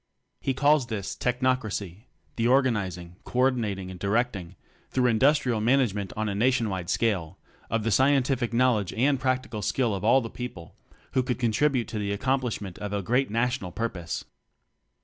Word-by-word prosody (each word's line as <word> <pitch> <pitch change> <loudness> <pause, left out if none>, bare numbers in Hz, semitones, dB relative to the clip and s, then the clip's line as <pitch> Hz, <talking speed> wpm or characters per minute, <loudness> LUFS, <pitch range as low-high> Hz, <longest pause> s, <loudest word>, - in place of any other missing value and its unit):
He 135 - -1
calls 145 -1 +3
this 105 -5 -4
"Technocracy" 125 -6 -1 0.3
the 115 0 +1
organizing, 100 -10 +1
co - - -7
ordinating 110 -8 +1
and 90 - -9
directing 100 -3 -1 0.3
through 130 -1 +1
industrial 125 0 +3
management 110 -5 +1
on 110 0 -1
a 100 - -1
nation 120 +2 +2
wide 90 -2 -4
scale 95 -6 0 0.3
of 115 0 0
the 115 - 0
scientific 130 0 +2
knowledge 115 -5 +2
and 135 +6 +2
practical 130 -4 -1
skill 115 +2 0
of 95 - -4
all 120 +5 +5
the 115 - -4
people 120 -9 -8 0.4
who 130 - +2
could 125 -1 -2
contribute 125 +2 +1
to 110 - -3
the 100 -1 -2
accomplish 130 +2 0
ment 95 -4 -8
of 105 0 -4
a 100 -1 -1
great 125 +7 +1
national 115 -4 -1
purpose. 90 -5 -4
115 Hz, 165 wpm, -26 LUFS, 100-130 Hz, 0.4 s, all